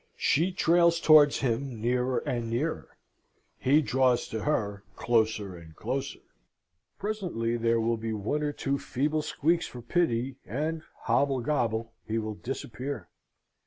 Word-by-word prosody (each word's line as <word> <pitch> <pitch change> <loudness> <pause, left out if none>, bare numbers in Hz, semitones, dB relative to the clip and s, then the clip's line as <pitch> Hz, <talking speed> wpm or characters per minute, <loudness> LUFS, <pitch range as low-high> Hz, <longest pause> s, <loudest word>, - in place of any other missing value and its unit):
She 170 +6 +2
trails 170 -1 +4
towards 155 -3 +6
him 125 -1 -1
nearer 125 +2 0
and 120 -2 -2
nearer; 140 +8 -3 0.6
he 145 +4 +4
draws 125 0 +2
to 110 - -3
her, 105 -9 -1
closer 110 -5 +1
and 80 -2 -13
closer. - - -3 0.8
Presently 180 - -2
there 115 0 +2
will 115 +1 +1
be 110 0 -4
one 110 +8 -1
or 150 -1 0
two 140 -1 -2
feeble 145 +3 -1
squeaks 165 +3 0
for 120 -1 -10
pity, 130 -3 0
and 155 +5 -2 0.2
hobblegobble 125 -5 +1
he 110 +1 -2
will 110 -1 -2
disappear! 125 -1 -5
125 Hz, 130 wpm, -28 LUFS, 115-150 Hz, 0.8 s, towards